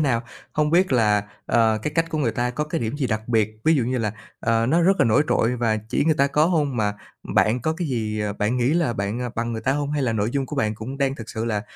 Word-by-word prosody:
nào? 130 -6 +1 0.3
Hông 150 0 +1
biết 180 -2 +3
là, 105 -4 +3 0.2
ờ, 110 -2 +3
cái 150 - -2
cách 165 0 +1
của 155 - -2
người 120 -6 +1
ta 120 0 -1
có 150 +5 -2
cái 155 +2 -3
điểm 115 +5 -2
gì 135 -3 0
đặc 110 0 -3
biệt? 110 -2 +2
Ví 160 - +5
dụ 130 - +2
như 125 +1 -1
là, 105 -2 -1 0.3
ờ, 115 0 +1
nó 165 +6 +3
rất 195 +2 +4
là - - +6
nổi 115 +6 +4
trội 125 +2 +2
và 115 -2 +1
chỉ - - +1
người 160 -1 +3
ta 140 -1 +3
có 150 +3 +2
hông 150 -7 0
mà 105 -2 0 0.4
bạn 115 +4 +3
có 155 - +1
cái 160 -1 -3
gì, 110 -4 -2
ờ, 105 -1 -1
bạn 105 +5 -1
nghĩ 125 +3 +2
là 165 -7 +1
bạn, 100 +2 -3
ờ, 125 -1 -3
bằng 115 +1 -2
người 110 - -4
ta 135 - +2
hông? 145 0 -2
Hay 145 -2 0
là 120 -3 +1
nội 110 +1 0
dung 135 -1 -1
của 150 - -6
bạn 110 -4 0
cũng 130 +6 -7
đang 135 -1 +1
thực 115 -4 -9
sự 110 +1 -3
là 105 -3 -1
125 Hz, 295 wpm, -23 LUFS, 110-145 Hz, 0.4 s, là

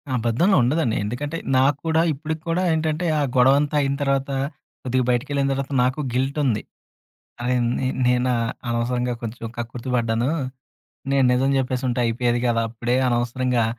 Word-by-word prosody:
అబద్ధంలో 120 - +2
ఉండదండి. 125 -2 +1
ఎందుకంటే, 145 +9 -3 0.2
నాక్కూడా 145 +5 +2
ఇప్పటికి 155 +2 -5
కూడా 180 +3 +1
ఏంటంటే, 160 +2 -1
ఆ - - +1 0.2
గొడవంతా 140 +4 +4
అయిన 140 0 0
తర్వాత, 140 0 0 0.5
కొద్దిగా 130 -1 0
బయటికి 120 +2 0
వెళ్ళిన 140 -1 +1
తర్వాత, 135 +1 -4
నాకు 130 +4 0
గిల్ట్ 135 +4 0
ఉంది. 110 -5 0 0.8
అరే! 125 +1 +1 0.2
నే 130 - -1 0.2
నేను 125 0 +2
ఆహ్, 115 -1 -1 0.2
అనవసరంగా 120 +1 -1
కొంచెం 115 0 -5
కక్కుర్తి 120 +2 -5
పడ్డాను. 115 +3 0 0.8
నేను 135 -1 +4
నిజం 135 +2 +2
చెప్పేసి 130 0 -2
ఉంటే 125 - -1
అయిపోయేది 120 +1 +1
గదా! 115 -1 +2
అప్పుడే. 120 +2 -1
అనవసరంగా 120 0 +1
125 Hz, 150 wpm, -23 LUFS, 120-140 Hz, 0.8 s, గొడవంతా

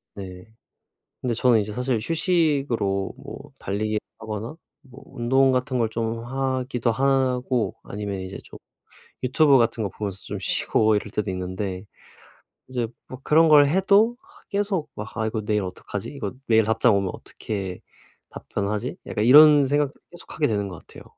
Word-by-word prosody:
네. 90 -2 -9 0.8
근데 120 -2 -1
저는 120 -2 +4
이제 105 +1 -4
사실 125 +1 -1
휴식으로 140 - +1
뭐 - - -10
달리기 105 +2 -2 0.2
하거나 110 +4 -6 0.3
뭐 135 -2 -15
운동 130 +3 +2
같은 125 0 0
걸 115 -2 +1
좀 115 0 -3
하기도 130 -2 -1
하고 130 -2 +1
아니면 100 -1 -5
이제 95 +1 -7
좀 - - -12 0.7
유튜브 140 +2 +5
같은 115 -1 +1
거 100 - -2
보면서 100 0 -5
좀 - - -6
쉬고 110 -1 +2
이럴 105 0 -3
때도 105 -1 -2
있는데 95 +1 -4 0.8
이제 120 -3 -2 0.2
뭐 130 - -9
그런 160 +2 +5
걸 145 -2 +7
해도 200 +8 +3 0.3
계속 200 -5 -1
막 110 +3 -8
'아 110 0 0
이거 110 0 -2
내일 105 -1 +1
어떡하지? 95 +2 -6
이거 140 - -5
내일 110 -1 +5
답장 110 0 +3
오면 100 -2 0
어떻게 95 -4 -6 0.5
답변하지?' 100 +1 -4
약간 105 - -1
이런 145 +2 +8
생각도 145 +1 +1 0.2
계속 175 - -12
하게 150 -2 +2
되는 100 -3 -1
것 90 - -9
같아요. - - -13
115 Hz, 310 characters per minute, -24 LUFS, 105-135 Hz, 0.8 s, 이런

